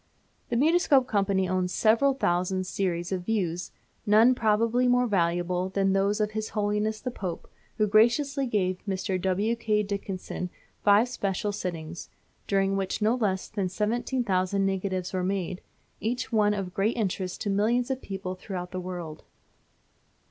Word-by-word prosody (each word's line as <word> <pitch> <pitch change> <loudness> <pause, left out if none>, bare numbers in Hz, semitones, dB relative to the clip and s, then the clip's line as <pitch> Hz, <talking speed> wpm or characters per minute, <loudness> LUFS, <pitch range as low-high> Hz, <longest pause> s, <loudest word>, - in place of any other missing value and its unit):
The - - -1
Mutoscope 290 -1 +4
Company 195 -4 +1
owns 185 0 0
several 235 +7 +3
thousand 185 -4 0
series 175 -2 -2
of 185 -1 -1
views, 180 -6 -1 0.3
none 220 +4 +6
probably 230 +2 +2
more 245 0 +4
valuable 175 -2 0
than 195 0 +1
those 200 +2 +1
of 210 0 0
his 215 0 -3
Holiness 210 +1 0
the 250 +3 -4
Pope, 185 -7 -5 0.3
who 215 - +3
graciously 250 +6 +3
gave 185 -5 0
Mr. 190 -1 -1
W. 195 +5 +1
K. 215 -2 +1
Dickson 195 -2 -4 0.3
five 205 +3 +5
special 205 -4 -2
sittings, 170 -4 -5 0.4
during 195 -1 +2
which 195 -1 -2
no 215 +1 +3
less 205 -6 -1
than 200 -4 -2
17,000 210 -2 0
negatives 190 -1 -2
were 185 -1 -1
made, 185 -1 -2 0.4
each 240 +4 -2
one 210 -2 +3
of 190 -3 -4
great 210 +5 0
interest 190 -4 -2
to 205 - -1
millions 235 +6 +1
of 265 0 -2
people 190 -2 -5
throughout 180 -1 -6
the 185 - -4
world. 175 -4 -6
200 Hz, 150 wpm, -27 LUFS, 185-220 Hz, 0.4 s, none